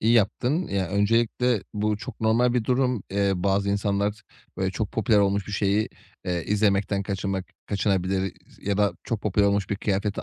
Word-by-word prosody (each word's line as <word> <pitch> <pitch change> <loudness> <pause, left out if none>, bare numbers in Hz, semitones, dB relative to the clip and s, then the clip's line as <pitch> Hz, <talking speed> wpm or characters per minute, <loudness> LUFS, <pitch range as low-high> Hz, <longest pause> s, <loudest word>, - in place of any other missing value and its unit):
İyi 115 +2 +3
yaptın. 125 - +2
Ya, 95 -3 -1
öncelikle 115 +3 +2
bu 105 0 0
çok 110 - -9
normal 115 +2 +3
bir 120 -3 +1
durum. 125 -3 +1
Eee, 100 0 +2
bazı 100 +2 +1
insanlar 100 +1 0 0.3
böyle 95 0 0
çok 100 +1 -3
popüler 110 -1 +3
olmuş 100 -1 +2
bir 105 - -7
şeyi, 100 +2 +1 0.4
eee, 90 -2 -2
izlemekten 100 -1 +1
kaçınmak 95 -1 -2 0.2
kaçınabilir 95 -2 0 0.2
s - - -11
ya 100 - +1
da 100 -1 +3
çok 115 -3 -2
popüler 105 0 +2
olmuş 100 -1 +1
bir 100 - 0
kıyafeti 100 0 -1
100 Hz, 175 wpm, -25 LUFS, 100-110 Hz, 0.4 s, İyi